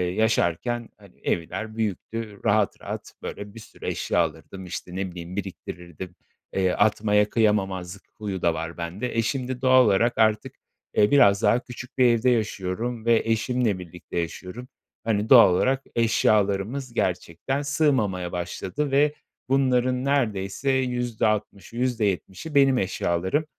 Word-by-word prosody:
yaşarken, 110 +2 0
hani, 100 -3 -19
evler 110 +6 -3
büyüktü. 110 0 -4
Rahat 105 -1 +2
rahat, - - -7
böyle, 100 0 -7
bir - - -8
sürü 110 - -12
eşya - - -1
alırdım, 95 -1 -3
işte, 90 0 -7
ne 95 -1 -3
bileyim, 85 +1 -8
biriktirirdim, 90 -2 -7 0.4
eee, 95 -1 +2
atmaya 105 0 +2
kıyamamazlık 100 -4 0
huyu 100 -4 -4
da 85 -1 +2
var 80 +1 -5
bende. 95 +9 -4
E, - - +4
şimdi 125 +2 -3
doğal 130 -1 +6
olarak 110 +4 +2
artık, 110 -1 +2 0.4
e, 105 - +5
biraz 100 -8 +5
daha 120 - +4
küçük 125 0 -10
bir 130 - +5
evde 120 +1 +4
yaşıyorum 110 +1 -2
ve 115 -1 +4
eşimle 115 -2 0
birlikte 90 0 -6
yaşıyorum. 90 +8 -6 0.4
Hani, 110 -1 0
doğal 115 -8 +8
olarak 135 +7 +1
eşyalarımız 110 +2 +1
gerçekten 95 - -2
sığmamaya 130 - +1
başladı 95 +9 -3
ve 145 +2 +3 0.4
bunların 130 -1 +2
neredeyse 120 -3 0
%60'ı, 115 -6 -1
%70'i 115 - -2
benim 135 -2 +5
eşyalarım. 95 - 0
110 Hz, 130 wpm, -25 LUFS, 95-125 Hz, 0.4 s, doğal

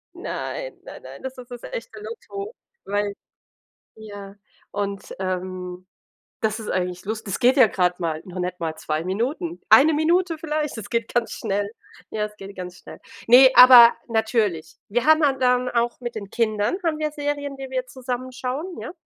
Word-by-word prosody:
Nein, - - -5
nein, - - -11
nein, - - -11
das 265 0 -6
ist 250 0 -11
das 245 -1 -8
echte - - -7
Lotto, 435 -1 -7 0.3
weil 205 0 -1 0.8
ja. 205 -2 -10 0.4
Und, 200 -1 -4
ähm, 185 -1 -4 0.5
das 220 0 -1
ist 215 - -6
eigentlich 180 -1 -2
lus 215 +2 -4
das 195 - -4
geht 255 +3 +4
ja 255 - +8
grad 180 -3 0
mal, 160 -2 -2
noch 185 0 -10
nicht 180 0 -3
mal 160 -1 -3
2 155 0 -3
Minuten. 270 - -2
1 305 +3 +7
Minute 335 +2 +2
vielleicht, 305 -3 -3
es 220 - -7
geht 230 -1 -1
ganz 240 -1 0
schnell. 205 -1 -2 0.4
Ja, 210 -1 -1
es 210 0 -11
geht 195 0 -10
ganz 180 -1 -7
schnell. - - -12 0.3
Ne, 255 +3 +9
aber 250 -2 +10
natürlich. 220 -7 0
Wir 235 +4 0
haben 315 0 +5
han 270 -2 +1
dann 250 0 +2
auch 235 0 0
mit 240 -1 -5
den 200 -3 -7
Kindern 215 - 0
haben 310 -2 0
wir 305 -1 0
Serien, 290 -1 -3
die 265 -1 -8
wir 255 -1 -2
zusammen 255 0 -5
schauen, 275 +8 -4
ja, - - -6
235 Hz, 180 wpm, -23 LUFS, 200-275 Hz, 0.8 s, aber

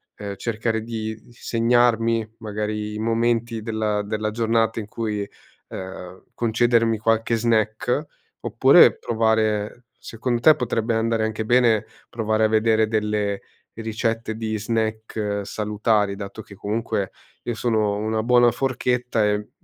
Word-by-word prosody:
ehm, 100 -1 -6
cercare 110 +1 -2
di 110 -1 -5
segnarmi 115 -1 +1
magari 105 -1 -3
i - - -5
momenti 115 0 0
della 110 -2 -1
della 110 +1 -2
giornata 115 0 +1
in 110 - -5
cui, 105 -1 -3
e 100 - -6 0.4
ehm, 95 -1 -8
concedermi 115 -1 +2
qualche 115 +2 +1
snack. 115 +4 0 0.4
Oppure - - +6
provare 110 0 0
secondo 120 +1 -3
te 155 +4 +7
potrebbe 115 -1 -1
andare 115 0 +1
anche 110 0 -2
bene 120 -2 +3 0.2
provare 110 -1 0
a - - +4
vedere 110 0 +3
delle 105 -2 -1 0.3
ricette 115 0 -2
di 110 -1 -3
snack 110 -1 -2
salutari, 105 0 0
dato 100 +1 -7
che 100 - -14
comunque 100 -1 -2 0.3
io 120 - -2
sono 110 -3 +1
una 110 +1 -1
buona 120 0 +5
forchetta 125 -2 0
e 105 0 -1
110 Hz, 130 wpm, -23 LUFS, 105-115 Hz, 0.4 s, te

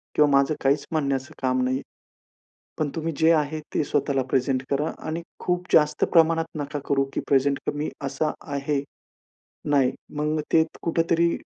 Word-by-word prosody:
किंवा 150 -1 +5
माझं 140 +2 +3
काहीच 140 +1 +2
म्हणण्याचं 140 -2 -1
काम 130 -1 +1
नाहीये. 130 +1 0 1.0
पण 155 -2 +1
तुम्ही 165 0 -2
जे 160 +1 +5
आहे, 155 -1 +1
ते - - +2
स्वतःला 140 -1 0
प्रेझेंट 130 0 +1
करा 145 +3 0 0.2
आणि 160 +2 -2 0.2
खूप 180 0 -1
जास्त 150 -1 +4
प्रमाणात 165 -1 +4
नका 145 0 -3
करू 135 -1 +2
की - - -1
प्रेझेंट 140 0 +3
कमी 145 +1 -1 0.2
असा 140 +3 -1 0.2
आहे. 140 0 -1 0.9
नाही, 135 -3 +3 0.2
मग 150 +1 0
ते 160 -1 +6 0.2
कुठे 165 0 +1
तरी 170 0 +3
145 Hz, 155 wpm, -25 LUFS, 140-160 Hz, 1.0 s, ते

